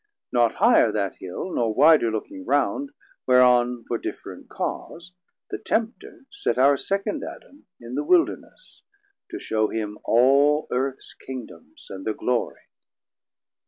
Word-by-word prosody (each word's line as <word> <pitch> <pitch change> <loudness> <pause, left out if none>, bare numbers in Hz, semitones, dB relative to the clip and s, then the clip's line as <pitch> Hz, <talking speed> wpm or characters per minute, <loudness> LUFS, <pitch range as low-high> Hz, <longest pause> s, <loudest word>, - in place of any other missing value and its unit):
380 - - -30
Not 120 -2 +2
higher 175 - +5
that 100 -2 -2
Hill 95 - -6
nor 115 -2 0
wider 155 -6 +5
looking 110 -3 -5
round, 145 - 0 0.4
Whereon 125 -1 +4
for 120 - -2
different - - -8
cause 175 +2 -6 0.4
the - - -4
Tempter 230 +4 -3
set 405 - -2
Our 140 +2 +5
second 195 +8 -2
Adam 285 +1 -11
in 120 +1 -10
the 145 +3 -1
Wilderness, 360 - -1 0.5
To - - -6
shew 110 -1 0
him 105 -2 -4
all 140 +5 +3
Earths 130 +1 -3
Kingdomes 125 -10 -11
and 95 0 -7
thir 110 - -2
Glory. 125 +2 -2
125 Hz, 135 wpm, -24 LUFS, 115-155 Hz, 0.5 s, higher